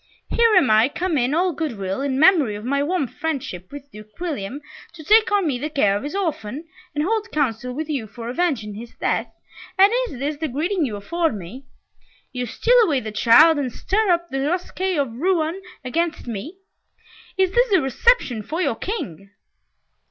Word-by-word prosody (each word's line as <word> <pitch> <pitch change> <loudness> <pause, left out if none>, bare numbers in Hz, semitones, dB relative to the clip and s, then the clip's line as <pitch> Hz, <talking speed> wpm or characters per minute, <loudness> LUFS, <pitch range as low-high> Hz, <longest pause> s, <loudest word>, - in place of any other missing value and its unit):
"Here 465 -1 +4
am 280 -11 +5
I 220 +4 +5
come 350 +2 -2
in 260 +1 +1
all 355 +1 +1
good 290 -6 -3
will, 195 +4 -3
in 275 -1 -1
memory 310 - +5
of 210 +2 -8
my 280 +2 0
warm 305 0 0
friendship 255 - -5
with 285 0 -10
Duke 215 +4 -14
William, 285 - -4 0.3
to 325 -2 -11
take 435 +7 +4
on 405 -3 +2
me 270 -6 -1
the 300 +4 -3
care 240 -10 +2
of 205 - -2
his 295 +6 -5
orphan, 315 - -3 0.3
and 295 - 0
hold 440 +4 -1
council 250 -4 -1
with 305 +3 -4
you 275 -8 -3
for 230 +3 -9
avenging 250 -7 -1
his 230 +3 -10
death, - - -1 0.5
and 395 +3 +6
is 275 - -9
this 285 +3 -3
the 315 +1 -2
greeting 315 +5 -1
you 215 - -5
afford 325 +8 -1
me? 205 +9 -10 0.7
You 250 -1 -3
steal - - +3
away 300 -10 +1
the 220 -3 -6
child, 290 +9 +6
and 260 -3 -2
stir 415 - 0
up 345 -1 +1
the 270 - -2
rascaille 360 +4 -1
of 270 -5 -1
Rouen 345 +1 0 0.2
against 335 +6 -1
me. 245 - -6 0.8
Is 380 -1 +2
this 485 +4 +3
the 385 -3 +4
reception 270 - +2
for 315 - -5
your 370 - 0
King?" 195 - -5
290 Hz, 190 wpm, -22 LUFS, 240-355 Hz, 0.8 s, and